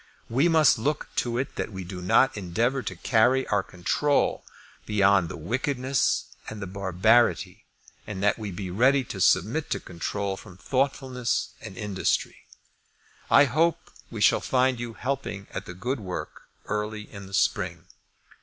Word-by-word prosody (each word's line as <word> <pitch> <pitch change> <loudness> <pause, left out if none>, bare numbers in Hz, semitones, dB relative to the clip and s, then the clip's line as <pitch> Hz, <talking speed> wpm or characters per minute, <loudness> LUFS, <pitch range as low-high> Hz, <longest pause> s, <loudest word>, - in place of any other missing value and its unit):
We 135 +8 +3
must 155 -8 +5
look 145 +7 -1
to 120 -1 0
it 135 +2 -3
that - - -3
we 95 -2 -6
do 90 0 -7
not 110 +9 +3
endeavour 115 +8 0
to - - -5
carry 125 +3 +3
our 100 -1 +2
control 135 +11 0 0.4
beyond 100 -4 +3
the - - -6
wickedness 130 - 0 0.2
and 110 - -7
the 95 - -4
barbarity, 100 +5 +2 0.4
and 100 -2 -5
that 105 +2 +2
we 105 -2 -4
be 95 0 -5
ready 130 +7 +3
to 100 -5 -6
submit 105 - +2
to - - -1
control 95 +3 -4
from 95 -3 -13
thoughtfulness 130 - -1
and 95 - -9
industry. 105 -3 -2 0.8
I 145 - +7
hope 160 +6 0 0.2
we - - -6
shall - - +5
find 130 -1 +1
you 120 -2 -5
helping 130 -6 -3
at 95 - -6
the 90 - -8
good 125 +8 -2
work 90 -4 -7 0.2
early 105 0 -3
in 100 -2 -11
the 95 - -14
spring. - - 0
110 Hz, 155 wpm, -26 LUFS, 95-130 Hz, 0.8 s, I